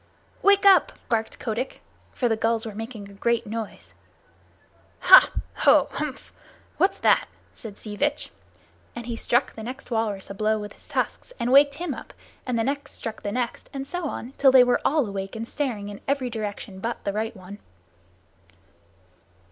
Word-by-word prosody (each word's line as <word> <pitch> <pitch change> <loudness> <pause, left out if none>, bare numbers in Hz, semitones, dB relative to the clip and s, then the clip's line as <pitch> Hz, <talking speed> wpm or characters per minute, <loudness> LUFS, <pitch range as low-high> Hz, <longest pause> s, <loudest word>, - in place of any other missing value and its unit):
"Wake 400 0 +4
up!" 380 -6 +6 0.2
barked 225 -1 -1
Kotick, 240 +2 -3 0.3
for 245 - 0
the 225 - +2
gulls 225 +1 0
were 220 - -6
making 220 -1 -7
a 200 - -14
great 235 +3 0
noise. 220 0 -6 1.1
"Hah! - - +9 0.3
Ho! - - +5
Hmph! 300 -3 -5 0.5
What's 380 - +2
that?" - - +3 0.3
said 210 -3 -10
Sea 210 -1 -8
Vitch, 290 +6 -1 0.6
and 240 -1 -6
he 235 -1 -4
struck 240 +1 +1
the 225 - -9
next 255 +3 -8
walrus 215 -4 -2
a - - -4
blow 215 +2 +1
with 210 -1 -7
his - - -19
tusks - - -3
and 240 - 0
waked 280 +1 +6
him 340 -2 -3
up, - - -10 0.3
and 250 -2 0
the 225 - +1
next 280 +3 -3
struck 225 -1 -6
the 205 - -3
next, 245 +1 -3
and 270 -1 -4
so 355 +4 -4
on 255 0 -6
till 270 -2 +6
they 260 -1 +8
were 245 0 +2
all 300 -2 +2
awake 195 -1 -5
and 225 +1 -5
staring 235 -9 -3
in 205 - -9
every 270 -3 0
direction 205 -3 -5
but 230 +4 -4
the 200 - -2
right 220 +1 -3
one. 190 +2 -11
230 Hz, 180 wpm, -25 LUFS, 215-270 Hz, 1.1 s, Hah